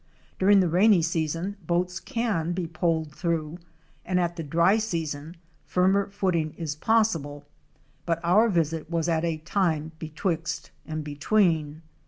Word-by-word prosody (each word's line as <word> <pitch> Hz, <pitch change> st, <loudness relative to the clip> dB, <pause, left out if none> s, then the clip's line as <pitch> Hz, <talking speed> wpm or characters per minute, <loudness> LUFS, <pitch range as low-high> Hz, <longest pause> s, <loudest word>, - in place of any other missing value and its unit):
Dur 190 Hz, -, +3 dB
ing 200 Hz, -1 st, +7 dB
the 180 Hz, -, +2 dB
rainy 180 Hz, +1 st, +4 dB
season 165 Hz, +4 st, -2 dB
boats 180 Hz, +2 st, 0 dB
can 200 Hz, -9 st, -1 dB
be 180 Hz, -1 st, -2 dB
poled 160 Hz, -2 st, -1 dB
through, 165 Hz, -1 st, -2 dB, 0.4 s
and 180 Hz, 0 st, 0 dB
at 175 Hz, -1 st, 0 dB
the 170 Hz, -, -5 dB
dry 170 Hz, +7 st, +3 dB
season 165 Hz, -5 st, -4 dB, 0.3 s
firmer 190 Hz, +2 st, +2 dB
footing 175 Hz, -6 st, -1 dB
is 155 Hz, -3 st, -3 dB
possible, 155 Hz, -8 st, 0 dB, 0.6 s
but 165 Hz, -1 st, +1 dB
our 210 Hz, +7 st, +4 dB
visit 165 Hz, -4 st, -1 dB
was 165 Hz, -1 st, -1 dB
at 165 Hz, -1 st, +1 dB
a 165 Hz, -2 st, 0 dB
time 160 Hz, -1 st, -1 dB
betwixt 160 Hz, +1 st, -3 dB, 0.2 s
and 155 Hz, 0 st, -4 dB
between. 155 Hz, 0 st, +1 dB
170 Hz, 145 wpm, -26 LUFS, 160-185 Hz, 0.6 s, ing